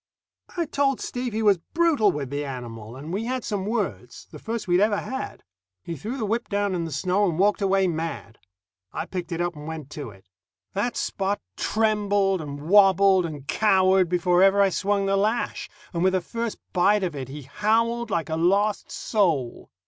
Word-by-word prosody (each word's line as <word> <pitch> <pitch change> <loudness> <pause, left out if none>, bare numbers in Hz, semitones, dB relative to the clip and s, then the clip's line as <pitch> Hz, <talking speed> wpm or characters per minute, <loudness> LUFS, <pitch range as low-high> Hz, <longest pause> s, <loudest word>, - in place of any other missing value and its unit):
I 340 - +1
told 280 -3 0
Steve 245 0 -4
he 220 +1 -2
was 200 -4 +4 0.2
brutal 315 - +4
with 140 -5 -5
the 145 +1 -2
animal, 120 -4 -7
and 150 +6 -7
we 210 +4 -2
had 255 +1 -2
some 200 -2 -3
words 230 +2 -3
the - - -10
first 225 -2 -4
we'd 175 0 +3
ever 205 0 +3
had. 265 +5 -5 0.4
He 170 - -5
threw 220 - -5
the 225 - -2
whip 225 +3 -2
down 205 -2 0
in 170 -2 -1
the 165 - -6
snow 185 +7 +1
and 160 - -3
walked 205 +3 +2
away 195 -1 +3
mad. 160 -8 -4 0.5
I - - -4
picked 180 -2 -5
it 170 0 -2
up 175 -1 -1
and 150 +1 -9
went 155 -3 -7
to 145 -5 -6
it. 95 -2 -17 0.5
That 210 +5 -1
Spot 195 +1 -1 0.2
trembled 205 -4 +1
and 145 -1 -7
wobbled 195 -1 +5
and 145 -4 -8
cowered 190 -3 +3
before 180 0 +2
ever 195 +1 +5
I 200 -1 +5
swung 200 +2 0
the 195 0 +2
lash, 215 +4 -1 0.2
and 170 0 -1
with 190 0 +3
the 185 - +3
first 230 +4 -4 0.2
bite 200 +3 +3
of 175 -5 -2
it 130 -2 -6
he 145 +1 -8
howled 225 - 0
like 170 -4 -1
a - - +1
lost 200 +5 +1
soul. 165 - -1
195 Hz, 195 wpm, -25 LUFS, 165-210 Hz, 0.5 s, wobbled